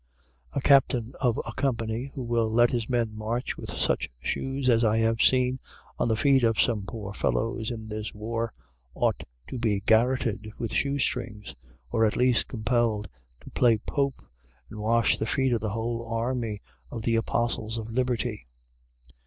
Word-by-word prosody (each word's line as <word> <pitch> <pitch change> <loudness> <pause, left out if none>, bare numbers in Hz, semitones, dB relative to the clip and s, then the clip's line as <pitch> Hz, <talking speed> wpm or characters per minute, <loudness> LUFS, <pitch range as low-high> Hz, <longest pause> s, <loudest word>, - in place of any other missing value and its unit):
A - - -1
captain 130 -3 +4
of 120 -4 +2
a - - -5
company, 115 -2 -1
who 130 - -4
will 115 -2 +1
let 120 +1 +4
his 120 -3 -2
men 115 -3 0
march 110 +3 -2
with - - -8
such - - 0
shoes 135 - -2
as 120 -2 +4
I 110 -1 +3
have 115 0 +2
seen 130 0 +3 0.4
on - - +2
the 110 - +2
feet 135 +3 +4
of 115 -2 +2
some 105 -5 +1
poor 105 -4 -6
fellows 110 +2 -1
in 110 -3 -6
this 110 0 -4
war, 115 +2 -3 0.4
ought - - 0 0.2
to 130 - -5
be 110 -4 +1
garroted 110 -1 +2
with 115 - -4
shoe 140 0 +1
strings, 115 -6 -2 0.4
or 115 - +2
at 110 - +2
least 125 -1 +3
compelled 115 -2 0 0.3
to - - -12
play 120 -3 +4
Pope 140 +5 -1 0.6
and 105 - -7
wash 115 +2 +2
the 110 - -1
feet 130 0 +1
of 115 - 0
the 110 - -1
whole 115 +2 -2
army 115 -2 -2 0.3
of 115 -2 -6
the 115 0 +2
Apostles 115 0 -1
of 115 0 -5
Liberty. 125 - -1
115 Hz, 170 wpm, -27 LUFS, 110-125 Hz, 0.6 s, captain